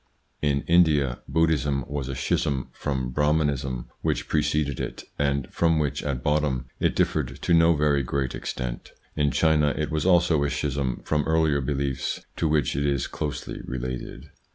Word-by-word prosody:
In 70 -2 +1
India, 75 -7 +3
Buddhism 75 -5 +1
was 70 -2 -4
a 65 - -3
schism 70 0 -1
from 65 -3 -2
Brahmanism 70 -3 0
which - - -1
preceded 75 -2 0
it, - - -5 0.2
and 70 -2 +1
from 80 -1 +3
which 75 -3 0
at 65 -4 -3
bottom 75 -4 +1
it - - +1
differed 65 -6 0
to 85 - +1
no 85 0 +5
very 75 -1 +2
great 65 0 -2
extent; 60 -2 -5 0.2
in 75 -1 +2
China, 75 -1 +3
it 75 0 -2
was 80 -1 0
also 85 -4 +4
a 70 - +1
schism 70 -3 -2
from 75 -1 +1
earlier 80 -3 +2
beliefs 70 -1 -2
to 80 - +1
which 75 -5 +1
it 70 - 0
is 70 -3 0
closely 75 -3 -5
related. 65 +2 -6
70 Hz, 160 wpm, -25 LUFS, 65-75 Hz, 0.2 s, no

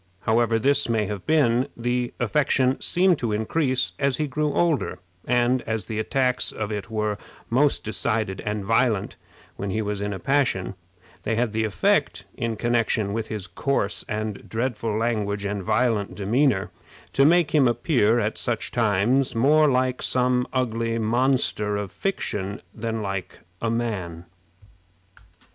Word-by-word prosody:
However 115 0 +2
this 140 +3 +2
may 110 -2 +1
have 100 -2 -6
been, 130 -6 +3
the 120 +1 -1
affection 130 +1 +1
seemed 180 -2 +2
to 115 -3 -1
increase 130 +5 0
as 140 -2 +1
he 155 - 0
grew 150 +2 -1
older, 150 - +1 0.3
and 125 +1 +2
as 110 -3 -2
the 110 +2 -4
attacks 125 +2 0
of 110 -1 -4
it 105 0 -4
were 105 -2 -1 0.3
most 140 +4 +2
decided 110 -2 -2
and 105 -1 -3
violent 115 -2 +1 0.4
when 100 - -3
he 110 - -1
was 105 -1 -3
in 105 0 -2
a 100 - -3
passion, 130 -8 0 0.5
they 115 - -1
had 115 -1 0
the 110 0 +1
effect, 100 -5 +1
in 115 -1 -2
connection 115 -3 0
with 110 0 -2
his 105 -4 -4
coarse 135 -8 -1
and 105 -1 -4
dreadful 115 -2 -2
language 105 -3 -1
and 100 0 -2
violent 110 0 0
demeanor, 105 +1 +1 0.4
to 135 - +4
make 165 +1 +4
him 145 -4 +5
appear 120 -2 +2
at 110 -1 -2
such 120 -2 -2
times 115 +4 +2
more 150 +6 +4
like 130 -1 +1
some 125 0 +1
ugly 115 -3 -1
monster 115 -2 +1
of 100 -3 -4
fiction 105 - -3
than 115 -1 -3
like 95 -2 -5 0.2
a 115 - 0
man. 100 -8 -3
115 Hz, 150 wpm, -24 LUFS, 105-130 Hz, 0.5 s, him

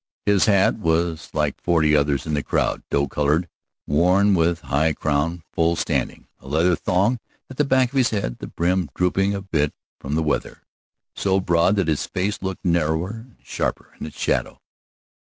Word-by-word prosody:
His 100 -2 +4
hat 100 0 +3
was 80 -2 0
like 75 -2 -1
forty 80 -3 +3
others 70 -1 +1
in 80 - -3
the 75 - +1
crowd, - - -1
doe 70 0 +1
colored, 75 +5 0 0.4
worn 90 +6 +3
with 85 -1 +1
the - - -19
high 80 +3 +1
crown 80 +3 -1
full 85 0 +2
standing, - - -2
a 65 - -16
leather 80 +5 +2
thong 100 +10 +1 0.3
at 130 - -10
the 150 - +3
back 130 -2 +3
of 130 -3 +3
the 105 - -1
head, - - -5
the - - -7
brim 90 -1 0
drooping 95 +2 +1
a 100 - -4
bit 75 -6 -1 0.2
from 70 +2 -4
the 80 - +1
weather, 75 - -2 0.5
so 95 -1 +1
broad 85 +1 +2
that 100 -5 0
his 80 -3 0
face 100 +3 -2
looked 95 +1 -5
narrower 85 +1 +1
and 115 +1 -11
sharper - - -4
in - - -5
its 75 - -12
shadow. - - -1
85 Hz, 185 wpm, -22 LUFS, 75-95 Hz, 0.5 s, His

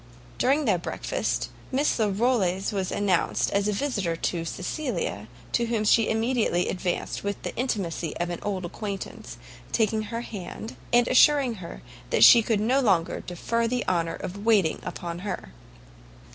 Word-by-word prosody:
During 280 +4 +2
their 200 -7 +2
breakfast, - - -2 0.2
Miss 275 -1 +1
Larolles 205 -3 +1
was 190 -2 -2
announced 195 -4 +1
as 200 +1 +1
a - - +2
visitor 200 -7 -1
to 165 0 -2
Cecilia, 180 - -3 0.2
to 235 -1 +1
whom 225 -2 0
she 215 +1 +4
immediately 225 -5 +1
advanced 180 -1 -2
with 200 0 -2
the - - -5
intimacy 190 - -2
of 175 0 -2
an 175 - -4
old 190 -3 -3
acquaintance, 200 +2 -6 0.3
taking 220 -1 +1
her 230 0 -3
hand, 210 0 -7 0.2
and 240 0 +4
assuring 270 -1 +5
her 170 - -9 0.4
she 235 - +9
could 220 -1 0
no 245 +6 +2
longer 190 -10 +2
defer 230 +6 -2
the 245 +1 -2
honour 170 -2 0
of 200 +3 -7
waiting 210 -8 +3
upon 170 -1 -5
her. 195 - -5
205 Hz, 150 wpm, -26 LUFS, 180-235 Hz, 0.4 s, she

